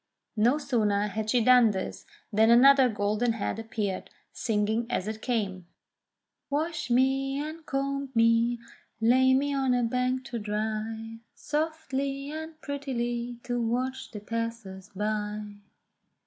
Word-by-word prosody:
No 235 +6 +3
sooner 210 -8 +1
had 215 +1 -3
she 240 0 +3
done 250 -1 +7
this 190 -2 -4 0.3
than 220 +2 +5
another 265 +2 +7
golden 215 +2 0
head 225 0 -3
appeared, 215 -4 -3 0.2
singing 220 +1 0
as 190 - -1
it 220 0 -4
came: 195 -7 -2 0.8
"Wash 310 0 -2
me, 270 +2 +2
and 310 +2 -5
comb 275 0 -2
me, 230 +1 +4 0.4
lay 260 +3 +5
me 285 +2 +1
on 265 -2 +2
a 245 - +1
bank 250 +2 0
to 240 -3 -4
dry 220 +1 -3 0.2
Softly 280 -3 -2
and 315 0 -7
prettily 240 -4 -3
to 245 -1 -2
watch 255 +3 -2
the 210 - -8
passers 225 -3 -5
by." 210 0 -3
235 Hz, 130 wpm, -28 LUFS, 215-270 Hz, 0.8 s, done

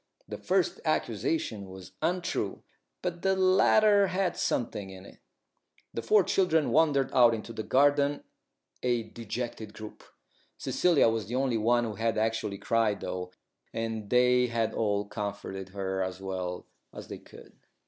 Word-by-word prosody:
The - - -7
first - - 0
accusation 115 - -1
was 95 0 -11
untrue, 170 - -2 0.4
but 175 -1 -3
the 190 0 +2
latter 200 +2 +5
had 185 -1 -1
something 105 -4 -2
in 95 0 -11
it. - - -15 0.7
The 115 - -3
four 205 - +4
children 165 -5 +2
wandered 145 -4 +3
out 120 -3 +6
into 115 +1 -7
the 110 - -4
garden, 145 +5 +2 0.6
a 120 -2 +1
dejected 110 -1 -6
group. 110 -1 -10 0.5
Cecilia 175 -8 +3
was 115 -3 -1
the 120 - -4
only 130 -3 +1
one 120 +2 +3
who 110 -2 -3
had 115 +1 -1
actually 110 -2 -1
cried 110 0 +1
though, 90 0 -5 0.4
and 115 -2 -3
they 125 0 +4
had 115 -2 -1
all 105 -2 0
comforted 100 -2 -5
her 95 0 -3
as 95 0 -3
well 95 -2 -4 0.3
as - - -10
they - - -7
could. - - -15
115 Hz, 150 wpm, -29 LUFS, 100-145 Hz, 0.7 s, out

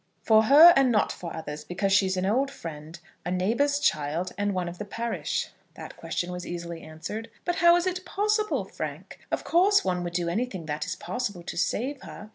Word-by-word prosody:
"For 220 0 +5
her 310 +8 +9
and 270 -2 +4
not 210 -3 +2
for 170 -2 -7
others, 150 -1 -6
because 195 +2 -1
she 195 -1 +4
is 185 0 -1
an 185 - 0
old 255 +8 +1
friend, 160 - -9 0.3
a - - -4
neighbour's 230 +11 +1
child, 165 - 0
and 205 +1 -1
one 185 -2 -2
of 175 +1 -7
the - - -3
parish." 230 +3 -3 0.3
That - - -9
question 175 0 -4
was 180 0 -5
easily 170 -2 -6
answered. 210 +9 -7 0.2
"But 350 0 -1
how 345 -1 +6
is 350 +1 +1
it 365 0 -2
possible, 425 +2 0
Frank? - - -7
Of - - -2
course 390 +4 +3
one 180 -1 0
would 175 -1 -5
do 170 -1 -1
anything 190 -2 -2
that 150 0 -3
it - - -10
is - - -3
possible 185 -1 -4
to - - -6
save 255 +10 -1
her. 210 -4 -10
200 Hz, 215 wpm, -26 LUFS, 175-275 Hz, 0.3 s, her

